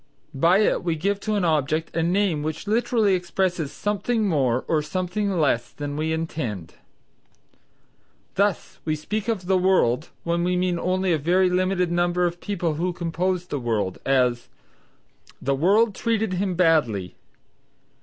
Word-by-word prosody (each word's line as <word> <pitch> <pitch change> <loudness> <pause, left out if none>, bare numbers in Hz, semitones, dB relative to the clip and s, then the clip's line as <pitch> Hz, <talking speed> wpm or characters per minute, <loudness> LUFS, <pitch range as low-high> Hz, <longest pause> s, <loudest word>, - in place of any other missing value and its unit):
By 170 +8 +4
it 210 - +1
we 170 -2 0
give 200 +5 -1
to 215 +1 -2
an 200 -3 +1
object 155 0 0
a 165 - +1
name 175 -2 +1
which 155 +4 -4
literally 220 -1 +2
expresses 180 -3 -1
something 210 +2 -1
more 130 -8 +1
or 155 -2 +2
something 185 +6 -2
less 125 -5 +1
than 145 -1 -5
we 155 +1 -1
intend. 155 - -4 1.6
Thus: 200 -1 -1
we 155 -1 -1
speak 210 +7 -4
of 215 -6 -1
the 185 0 +2
world 170 -7 +2
when 170 0 0
we 180 0 +1
mean 180 -1 0
only 185 0 +1
a 160 - +1
very 180 +5 +2
limited 180 -1 +1
number 175 +1 +1
of 175 - +1
the - - -18
people 175 -6 -1
who 180 0 0
compose 180 +1 -2
the 145 -5 -4
world: 110 -6 -2
as, 125 -3 +1 0.9
"The 140 - 0
world 200 +10 +3
treated 220 -2 -1
him 185 0 -1
badly." 145 - +2
175 Hz, 155 wpm, -24 LUFS, 155-190 Hz, 1.6 s, By